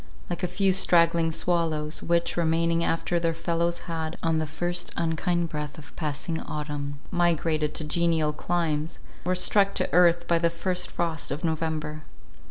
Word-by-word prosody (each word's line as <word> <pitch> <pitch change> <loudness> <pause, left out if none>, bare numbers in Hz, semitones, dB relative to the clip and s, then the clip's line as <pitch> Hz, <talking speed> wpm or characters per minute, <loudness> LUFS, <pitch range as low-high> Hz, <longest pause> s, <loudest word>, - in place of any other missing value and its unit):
Like 175 - -3
a 180 - +1
few 190 +2 +2
straggling 170 -3 +3
swallows, 160 -2 0
which, 170 0 +1
remaining 165 0 +2
after 170 +1 0
their 165 -1 0
fellows 170 +1 -1
had, 160 -1 -4
on 165 -1 +2
the 155 - -1
first 175 +3 0
unkind 170 +1 0
breath 150 -1 -5
of 145 -2 -12
passing 160 +1 -2
autumn, 145 -1 -4
migrated 165 -3 +1
to - - -1
genial 160 -1 +1
climes, 160 -1 -1 0.3
were 185 +1 +1
struck 200 +2 +3
to - - -1
earth 175 0 +5
by 170 -1 +3
the 170 0 +3
first 180 +2 -2
frost 165 -3 -2
of 145 +5 -4
November. 155 -2 -2
165 Hz, 160 wpm, -26 LUFS, 155-175 Hz, 0.3 s, earth